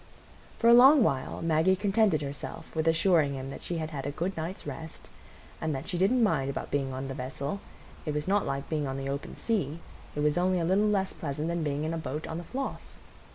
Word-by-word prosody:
For 230 - +2
a 235 - +9
long 265 +3 +8
while 135 -2 -1
Maggie 165 +3 +3
contented 200 -5 +2
herself 140 +3 -7
with 160 0 0
assuring 160 -3 +3
him 135 0 -5
that - - -8
she 175 - -3
had 160 0 -3
had 140 -2 -4
a - - -1
good 175 +6 -2
night's 165 +4 -5
rest, 160 +3 -8 0.5
and 160 -2 -1
that 135 - -5
she - - -3
didn't 230 +6 +4
mind 135 -10 +2
about 140 - -4
being 135 -2 0
on 130 +1 -4
the 135 - -4
vessel,—it 140 +5 -6
was 150 +2 -2
not 200 +1 +3
like 140 0 -3
being 150 -3 -1
on 135 0 -3
the 135 0 -3
open 140 +1 -4
sea, 170 - -1 0.4
it 145 - -1
was 150 +2 +2
only 185 +1 +2
a 165 - 0
little 195 +5 +3
less 195 -2 +1
pleasant 150 +1 -3
than 170 0 -1
being 145 -1 -1
in 160 +1 -1
a 165 - -2
boat 150 +1 -4
on 160 +1 -4
the - - -6
Floss. 270 +7 -5
160 Hz, 230 wpm, -29 LUFS, 140-190 Hz, 0.5 s, a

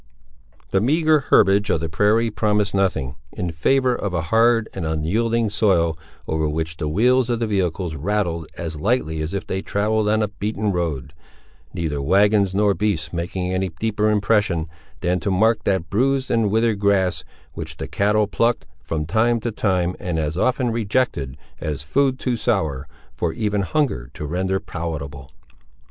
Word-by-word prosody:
The 95 - +2
meagre 155 +5 +3
herbage 100 +2 +4
of - - +2
the 80 - -2
prairie, 105 +7 +2
promised 105 -1 +1
nothing, 85 -9 0 0.2
in 90 -1 -3
favour 125 +11 +2
of 100 -6 -3
a 85 - 0
hard 115 +4 +3
and 95 - -4
unyielding 105 +9 0
soil, 90 -6 +2 0.3
over 80 -1 0
which 80 +1 -3
the 75 - -2
wheels 125 +8 +3
of 120 - +1
the 115 - -1
vehicles 90 -4 -1
rattled 85 0 -1
as 80 -2 -5
lightly 80 -6 0
as 80 +5 -3
if 100 - -3
they 95 - -3
travelled 105 +2 0
on 110 0 +2
a - - +1
beaten 105 +1 -2
road; 80 -6 -3 0.6
neither 75 -4 -2
wagons 100 +4 +3
nor 100 0 +3
beasts 95 -7 -1
making 90 +2 -2
any 95 0 0
deeper 110 -1 +1
impression, 100 -5 +1 0.3
than 90 +1 +1
to 100 - -2
mark 110 +4 +2
that 95 -4 0
bruised 135 +5 +1
and 115 -3 +2
withered 110 0 +1
grass, 100 -3 +2 0.3
which - - -7
the - - -5
cattle 105 +1 +2
plucked, 115 +3 0 0.2
from 75 -1 -3
time 115 +7 +2
to 120 - -2
time, 90 -4 0
and 90 -2 -3
as 75 0 -1
often 125 - +1
rejected, 110 - -1 0.2
as 75 -2 -4
food 130 - +1
too 125 -2 -1
sour, 95 - -1 0.3
for 85 -2 -2
even 105 +3 0
hunger 100 - -1
to 75 - -5
render 95 +4 -1
palatable. 75 -6 -6
100 Hz, 165 wpm, -22 LUFS, 80-110 Hz, 0.6 s, herbage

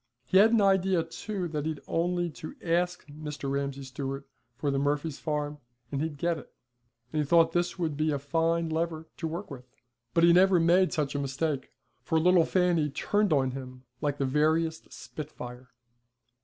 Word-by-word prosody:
He 185 +9 +4
had 220 +3 +7
an 230 -2 +4
idea 190 -3 +3
too 185 +3 -4
that 150 -1 -2
he'd 155 -2 -3
only 175 0 0
to 155 - -9
ask 175 +1 0
Mr. 150 -2 -6
Ramsay 140 0 -2
Stewart 135 +1 -5 0.3
for 140 +2 -1
the 135 - 0
Murphys' 145 +1 -1
farm 150 -1 -2 0.3
and 140 -1 -1
he'd 155 -2 -3
get 170 +2 0
it, - - -15 0.6
and 155 - +1
he - - +1
thought 165 +2 +4
this 175 +2 0
would 165 -4 -1
be 155 +1 +1
a 145 - +1
fine 165 +4 0
lever 160 0 -2
to 165 - -3
work 170 +3 -5
with. 125 -2 -9 0.5
But 165 - +4
he 170 0 +7
never 185 0 +6
made 175 +3 +4
such 150 -3 -1
a 145 - -1
mistake, 140 0 -2 0.3
for 160 - +1
little 175 0 +5
Fanny 175 -5 +2
turned 205 +7 0
on 135 -3 +3
him 130 -1 -8 0.2
like 145 -2 0
the 140 - 0
veriest 160 +4 +1
spitfire. 125 -4 -8
155 Hz, 185 wpm, -29 LUFS, 140-170 Hz, 0.6 s, had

